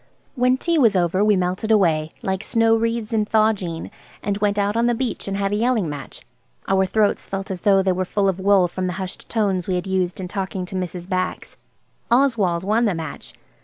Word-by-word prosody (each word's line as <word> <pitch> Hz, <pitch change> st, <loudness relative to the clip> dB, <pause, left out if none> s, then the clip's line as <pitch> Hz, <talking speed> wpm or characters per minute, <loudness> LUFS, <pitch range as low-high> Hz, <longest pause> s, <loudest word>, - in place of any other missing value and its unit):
When 250 Hz, -1 st, +2 dB
tea 335 Hz, +3 st, 0 dB
was 225 Hz, -7 st, +4 dB
over 180 Hz, +2 st, +2 dB
we 210 Hz, -1 st, +4 dB
melted 185 Hz, +4 st, -1 dB
away, 165 Hz, -7 st, +3 dB
"like 190 Hz, +1 st, -2 dB
snow 225 Hz, 0 st, +3 dB
wreaths 230 Hz, 0 st, -1 dB
in 215 Hz, -1 st, +2 dB
Thawjean," 210 Hz, -6 st, 0 dB, 0.3 s
and 200 Hz, 0 st, -1 dB
went 205 Hz, 0 st, +1 dB
out 205 Hz, +1 st, +1 dB
on 230 Hz, +1 st, +2 dB
the 240 Hz, -, +2 dB
beach 245 Hz, -3 st, -3 dB
and 195 Hz, 0 st, -2 dB
had 200 Hz, 0 st, -1 dB
a -, -, +1 dB
yelling 225 Hz, -4 st, +1 dB
match. 145 Hz, -2 st, -7 dB, 0.4 s
Our 190 Hz, 0 st, +2 dB
throats 210 Hz, +1 st, +1 dB
felt 195 Hz, 0 st, -4 dB
as 180 Hz, -2 st, -5 dB
though 195 Hz, -2 st, +4 dB
they 190 Hz, -, +2 dB
were 185 Hz, +1 st, 0 dB
full 195 Hz, +2 st, 0 dB
of 190 Hz, -1 st, 0 dB
wool 195 Hz, -1 st, +4 dB
from 185 Hz, +1 st, -3 dB
the 180 Hz, -, -2 dB
hushed 190 Hz, -2 st, -7 dB
tones 195 Hz, -6 st, 0 dB
we 185 Hz, -, 0 dB
had 180 Hz, -, -2 dB
used 185 Hz, -2 st, -1 dB
in 185 Hz, -, -4 dB
talking 190 Hz, -1 st, -4 dB
to 185 Hz, -, -8 dB
Mrs. 180 Hz, -1 st, -4 dB
Bax. 185 Hz, -1 st, -3 dB, 0.5 s
Oswald 230 Hz, -9 st, +2 dB
won 220 Hz, +4 st, +2 dB
the 200 Hz, -5 st, +1 dB
match. 160 Hz, -2 st, -7 dB
195 Hz, 215 wpm, -22 LUFS, 185-220 Hz, 0.5 s, was